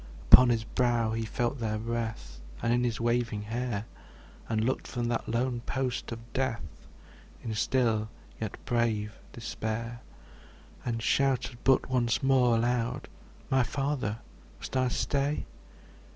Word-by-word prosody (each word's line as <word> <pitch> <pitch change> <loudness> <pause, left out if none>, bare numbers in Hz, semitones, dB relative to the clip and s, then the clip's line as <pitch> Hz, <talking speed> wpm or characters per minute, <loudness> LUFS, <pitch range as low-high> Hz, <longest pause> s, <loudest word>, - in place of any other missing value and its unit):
Upon 125 -1 +11
his 115 -2 +2
brow 120 -1 +1
he 115 0 -1
felt 120 +4 -1
their 110 -2 -1
breath, 110 - -4 0.2
And 115 - +3
in 120 0 +2
his 120 -3 0
waving 115 -2 0
hair; 115 -1 -2 0.6
And 110 -1 +1
looked 130 - -1
from 120 -2 -2
that 120 - -2
lone 120 +1 0
post 130 -2 -2
of 115 0 -8
death 115 - -3 0.6
In 110 - -3
still 110 -1 +1 0.3
yet 110 -3 -4
brave 110 -3 0
despair; 115 0 -4 0.8
And 115 -2 -2
shouted 130 -2 +1
but 135 -1 +4
once 125 -1 +1
more 130 -3 +4
aloud, 120 +2 0 0.4
``My 130 -1 +4
Father! 135 -5 -1 0.4
must - - -7
I 130 -1 +3
stay?'' 140 +3 0
120 Hz, 135 wpm, -29 LUFS, 110-125 Hz, 0.8 s, Upon